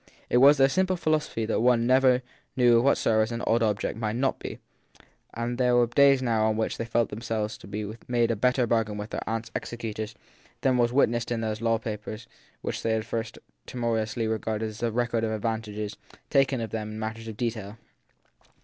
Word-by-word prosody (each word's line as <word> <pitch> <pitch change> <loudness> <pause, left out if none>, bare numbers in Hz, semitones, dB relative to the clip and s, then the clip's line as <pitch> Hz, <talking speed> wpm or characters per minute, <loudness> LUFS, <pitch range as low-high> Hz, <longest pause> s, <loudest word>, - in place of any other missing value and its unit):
It - - +4
was 140 +4 +7
their 135 0 +6
simple 185 +6 +1
philosophy 155 -8 0
that 110 - 0
one 120 0 +3
never 130 0 +4 0.3
knew 120 -2 +5
of - - +1
what 140 - +4
service 110 0 +2
an 115 0 -4
odd 115 +1 +2
object 105 0 0
might 110 -1 -1
not 135 +2 0
be; - - -6 0.8
and 120 +2 -3
there 125 -1 +3
were 120 0 +5
days 135 +2 +4
now 110 -3 +2
on 110 0 0
which 110 - -2
they 115 - -2
felt 115 0 +1
themselves 110 -1 -3
to - - -12
have 105 +3 -6
made 120 -1 +2
a - - 0
better 125 +3 +2
bargain 110 -2 0
with 105 +2 -6
their - - -3
aunt 115 0 -2
s 115 - -13
executors 110 -2 -5 0.5
than 130 -2 +2
was 120 0 +3
witnessed 120 -3 +2
in 115 -1 -1
those 110 0 -3
law 115 -1 +2
papers 110 0 -6 0.4
which - - -3
they 115 - 0
had 110 - +1
at - - -11
first 115 0 -4 0.3
timor 120 -2 -1
ously 110 +1 -2
regarded 110 0 -2
as 110 0 -10
the 120 -1 0
record 115 0 0
of 110 - 0
advantages 110 -1 -3 0.4
taken 135 -2 +3
of 115 - -4
them 110 -1 -4
in 110 - -6
matters 110 +1 -5
of 110 -2 -7
detail. 110 -3 -3
115 Hz, 215 wpm, -27 LUFS, 110-120 Hz, 0.8 s, was